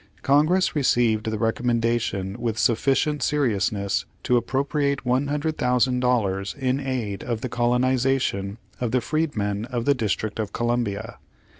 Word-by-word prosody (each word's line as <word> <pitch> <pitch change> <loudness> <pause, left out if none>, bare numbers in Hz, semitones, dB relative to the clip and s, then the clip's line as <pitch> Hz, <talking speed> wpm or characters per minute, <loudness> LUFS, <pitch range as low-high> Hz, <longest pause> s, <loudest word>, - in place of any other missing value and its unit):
Congress 155 +7 +3
received 115 -6 +2
the 110 - -2
recommendation 115 -3 0
with 115 -2 -2
sufficient 135 +6 +1
seriousness 105 -8 0 0.2
to 125 - +2
appropriate 140 +3 0
$100,000 125 -6 +1
in 130 0 0
aid 125 -7 -3
of 115 -2 -3
the 130 - -3
colonization 125 -4 +1 0.2
of 120 - -1
the 125 +3 +2
freedmen 110 -9 -1
of 120 -1 -3
the 145 - +4
Dis 110 -6 0
trict 110 0 -5
of 105 -2 -3
Columbia. 120 -4 -2
120 Hz, 125 wpm, -24 LUFS, 110-135 Hz, 0.2 s, the